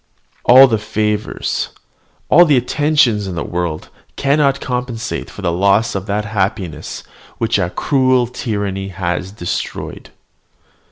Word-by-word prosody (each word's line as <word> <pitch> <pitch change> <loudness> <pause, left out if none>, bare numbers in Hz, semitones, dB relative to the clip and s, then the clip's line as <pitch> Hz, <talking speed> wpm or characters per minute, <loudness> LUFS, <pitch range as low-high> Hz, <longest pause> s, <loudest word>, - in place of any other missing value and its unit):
All 130 +2 +9
the 115 -5 0
favours, 105 0 -2 0.6
all 175 - +7
the 150 -6 +4
attentions, 125 -5 +2
in 90 - -5
the 85 - -2
world 85 -3 -3 0.3
cannot 140 0 +2
compensate 125 -2 -4
for 100 - -10
the 85 - +1
loss 100 +5 +2
of 95 +1 -4
that 105 +1 -1
happiness 95 -6 -3 0.3
which 115 -3 +1
a 90 -3 0
cruel 130 +3 +2
tyranny 100 -5 -3
has 90 0 -3
destroyed." 90 -4 -5
105 Hz, 125 wpm, -17 LUFS, 95-125 Hz, 0.6 s, All